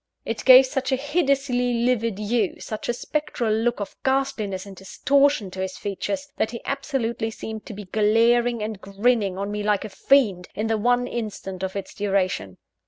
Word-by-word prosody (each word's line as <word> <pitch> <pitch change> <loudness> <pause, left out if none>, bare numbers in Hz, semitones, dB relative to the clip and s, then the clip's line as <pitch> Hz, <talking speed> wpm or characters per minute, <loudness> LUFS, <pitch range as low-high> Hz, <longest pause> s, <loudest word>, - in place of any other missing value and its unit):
It - - -4
gave 260 0 +10
such 265 0 -2
a - - +4
hideously 275 -4 +1
livid 230 -4 +1
hue, 210 -1 -1
such 215 +1 -6
a - - +2
spectral 245 -5 -2
look 230 +2 0
of 205 - -5
ghastliness 230 -8 -1
and 200 -1 -10
distortion 275 +3 +1
to 185 - -8
his 190 0 -4
features, 280 +9 -3
that - - +1
he 235 0 -8
absolutely 235 -5 -2
seemed 220 -1 -7
to 225 - -7
be 205 0 -8
glaring 230 +3 +3
and 215 -2 -5
grinning 200 -1 +1
on 200 +1 -3
me 210 0 -3
like 210 0 +1
a - - -6
fiend, 200 -4 +2
in 215 - -2
the 225 0 +1
one 245 +3 +2
instant 210 -6 -5
of 190 0 -3
its 200 - -5
duration. 190 - -1
225 Hz, 180 wpm, -24 LUFS, 200-250 Hz, -, gave